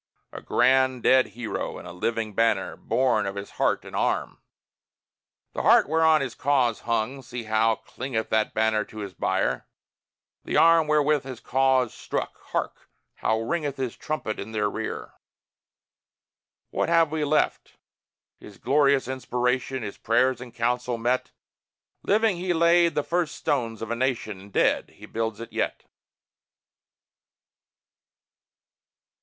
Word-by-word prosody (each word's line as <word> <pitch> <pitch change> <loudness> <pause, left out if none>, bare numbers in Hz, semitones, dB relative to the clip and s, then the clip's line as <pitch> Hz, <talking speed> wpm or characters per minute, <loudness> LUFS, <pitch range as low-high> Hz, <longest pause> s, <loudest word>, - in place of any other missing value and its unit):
A - - -8
grand 130 -1 +2
dead 130 0 +5
hero, 120 -2 -4
in - - -10
a 85 - -8
living 110 +3 -2
banner, 115 +3 +1
Born 125 -6 +1
of 100 - -4
his 100 0 -7
heart - - 0
and - - -9
arm: - - -1 1.1
The - - -2
heart - - +5
whereon 160 -1 +4
his 130 -3 -3
cause 130 -6 +1
hung 115 +4 -2
see 120 -1 -7
how 110 +1 +2
clingeth 120 -2 -5
That 110 -1 0
banner 110 -1 +2
to 110 - -14
his 100 -3 -6
bier! - - -1 0.8
The - - -1
arm 165 -1 +6
wherewith 150 -1 +2
his 130 -3 -8
cause 130 -3 +2
struck - - -4
hark! - - -4 0.3
how 110 0 0
ringeth 145 +3 -2
His 130 -3 -3
trumpet 150 -8 -4
in 110 +3 -7
their 105 -1 0
rear! 110 - -5 1.6
What - - 0
have 165 -2 +4
we 155 -1 -1
left? 150 +1 0 0.6
His 100 -2 -13
glorious 140 -1 +2
inspiration, 130 0 -1
His 100 - -7
prayers 125 +2 +2
in 125 -1 -9
council 120 +1 -1
met. 120 +3 0 0.7
Living, 215 -2 +2
he 180 0 -1
laid 170 -1 +4
the 150 - +1
first 170 -1 -1
stones 115 -6 -2
of 115 - -5
a - - 0
nation; 120 -5 -2
And 100 +1 -14
dead, - - +2
he - - -12
builds 115 -1 -3
it 115 - -9
yet. - - -2
125 Hz, 140 wpm, -25 LUFS, 110-145 Hz, 1.6 s, arm